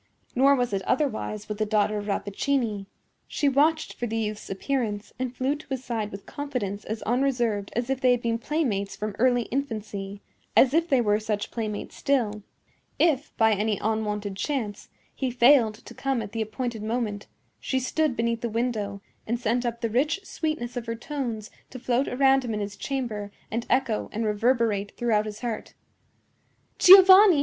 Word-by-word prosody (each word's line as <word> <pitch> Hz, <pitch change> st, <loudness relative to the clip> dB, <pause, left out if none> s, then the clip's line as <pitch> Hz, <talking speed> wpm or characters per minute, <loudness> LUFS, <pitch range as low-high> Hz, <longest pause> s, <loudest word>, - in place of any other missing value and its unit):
Nor 275 Hz, +3 st, +5 dB
was 245 Hz, -4 st, -1 dB
it 195 Hz, -, 0 dB
otherwise 220 Hz, -6 st, -1 dB
with 210 Hz, 0 st, -5 dB
the 215 Hz, -, +2 dB
daughter 210 Hz, 0 st, +1 dB
of 205 Hz, -, -7 dB
Rappaccini. 210 Hz, +1 st, -1 dB, 0.4 s
She 290 Hz, -, 0 dB
watched 300 Hz, +4 st, +2 dB
for 240 Hz, -, -4 dB
the 225 Hz, 0 st, -2 dB
youth's 215 Hz, -1 st, -3 dB
appearance, 210 Hz, 0 st, -2 dB
and 255 Hz, -1 st, -3 dB
flew 265 Hz, +3 st, 0 dB
to 300 Hz, -, -12 dB
his 265 Hz, -2 st, -4 dB
side 220 Hz, -3 st, -2 dB
with 200 Hz, 0 st, -9 dB
confidence 235 Hz, -9 st, -4 dB
as 220 Hz, +1 st, -5 dB
unreserved 240 Hz, -5 st, 0 dB
as 240 Hz, +1 st, -1 dB
if 270 Hz, 0 st, -2 dB
they 255 Hz, -, +4 dB
had 245 Hz, -1 st, +2 dB
been 230 Hz, 0 st, 0 dB
playmates 235 Hz, -9 st, -1 dB
from 210 Hz, -1 st, -4 dB
early 245 Hz, 0 st, +3 dB
infancy—as 215 Hz, -1 st, -1 dB
if 330 Hz, +2 st, +2 dB
they 265 Hz, -3 st, +4 dB
were 210 Hz, -2 st, +2 dB
such 215 Hz, -1 st, -3 dB
playmates 215 Hz, -3 st, -4 dB
still. 230 Hz, -7 st, 0 dB, 0.6 s
If, 305 Hz, -3 st, +1 dB
by 225 Hz, -2 st, +4 dB
any 210 Hz, 0 st, 0 dB
unwonted 210 Hz, -2 st, -2 dB
chance, 225 Hz, -6 st, -3 dB, 0.2 s
he 265 Hz, -, -2 dB
failed 240 Hz, -2 st, +5 dB
to -, -, -13 dB
come 270 Hz, -4 st, -1 dB
at 200 Hz, -, -8 dB
the 225 Hz, -, -3 dB
appointed 225 Hz, +1 st, -3 dB
moment, 215 Hz, -2 st, -2 dB, 0.3 s
she 265 Hz, -, -1 dB
stood 285 Hz, +1 st, 0 dB
beneath 230 Hz, 0 st, -1 dB
the 235 Hz, -, -2 dB
window 215 Hz, -4 st, -2 dB, 0.2 s
and 235 Hz, +2 st, -1 dB
sent 240 Hz, +1 st, 0 dB
up 235 Hz, 0 st, -4 dB
the 230 Hz, -, +1 dB
rich 300 Hz, -, +1 dB
sweetness 310 Hz, -9 st, -3 dB
of 240 Hz, -1 st, -4 dB
her 230 Hz, -, -2 dB
tones 235 Hz, -5 st, -5 dB, 0.2 s
to 260 Hz, -, -8 dB
float 255 Hz, +1 st, 0 dB
around 270 Hz, +1 st, +3 dB
him 230 Hz, -3 st, -3 dB
in -, -, -2 dB
his 205 Hz, 0 st, -4 dB
chamber 215 Hz, -4 st, -4 dB, 0.2 s
and 230 Hz, +2 st, -3 dB
echo 255 Hz, -5 st, +1 dB
and 225 Hz, +1 st, -2 dB
reverberate 215 Hz, -2 st, +1 dB
throughout 215 Hz, -3 st, +1 dB
his 210 Hz, 0 st, -7 dB
heart: 235 Hz, -3 st, -4 dB, 1.0 s
"Giovanni! 380 Hz, -2 st, +9 dB
235 Hz, 175 wpm, -26 LUFS, 210-265 Hz, 1.0 s, Giovanni